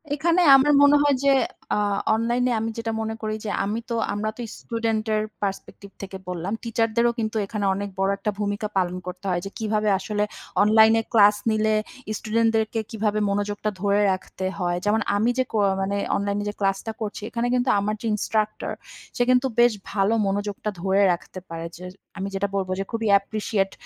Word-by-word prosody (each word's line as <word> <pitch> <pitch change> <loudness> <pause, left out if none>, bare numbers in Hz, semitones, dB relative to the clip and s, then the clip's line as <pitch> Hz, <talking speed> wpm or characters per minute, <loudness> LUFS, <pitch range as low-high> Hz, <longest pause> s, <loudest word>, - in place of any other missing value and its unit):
এখানে 335 +4 +2
আমার 270 +2 +5
মনে 285 0 +7
হয় 290 -1 +3
যে, 280 - +4 0.5
আ - - 0 0.4
অনলাইনে 240 +2 +1
আমি 225 +1 -2
যেটা 230 0 -2
মনে 220 0 -3
করি 215 -1 -2
যে - - -2
আমি 210 +3 -2
তো 235 - -1 0.2
আমরা 210 +1 -2
তো - - -6 0.2
স্টুডেন্টের 220 -2 -1 0.2
পার্সপেক্টিভ 200 0 -5
থেকে 195 -1 -6
বললাম। 180 +2 -3
টিচারদেরও 230 0 +1
কিন্তু 220 0 -2
এখানে 205 0 -3
অনেক 200 +1 -4
বড় 195 0 +2
একটা 205 +1 -2
ভূমিকা 205 +1 -1
পালন 180 -1 0
করতে 180 +2 -7
হয় 175 -1 0
যে - - -4
কিভাবে 215 -1 0
আসলে 210 +1 -1 0.4
অনলাইনে 220 +1 +5
ক্লাস 210 -2 +6 0.2
নিলে 215 0 +2 0.4
স্টুডেন্টদেরকে 225 0 +1
কিভাবে 215 -1 0
মনোযোগটা 205 +1 -1
ধরে 200 0 +2
রাখতে 185 0 -4
হয়। 175 -1 0
যেমন 215 +2 +2
আমি 215 +4 +2
যে 260 - +3
কো 225 - -1 0.2
মানে 195 +1 -1 0.2
অনলাইনে 200 0 -1
যে - - -5
ক্লাসটা 195 +2 0
করছি 210 -1 -4
এখানে 235 0 -1
কিন্তু 250 0 +1
আমার 205 +2 -1
যে - - -6
ইন্সট্রাক্টর 215 0 -1 0.4
সে 245 - +2
কিন্তু 255 +1 +4
বেশ 240 0 +6 0.2
ভালো 200 +1 +2
মনোযোগটা 205 +1 -2
ধরে 195 +2 +2
রাখতে 175 +2 -7
পারে। 165 0 -5
যে 180 - -11 0.3
আমি 195 0 -3
যেটা 200 +1 0
বলবো 190 -1 -1
যে - - 0
খুবই 225 -1 -2
অ্যাপ্রিশিয়েট 200 0 +1
215 Hz, 180 wpm, -24 LUFS, 200-225 Hz, 0.5 s, মনে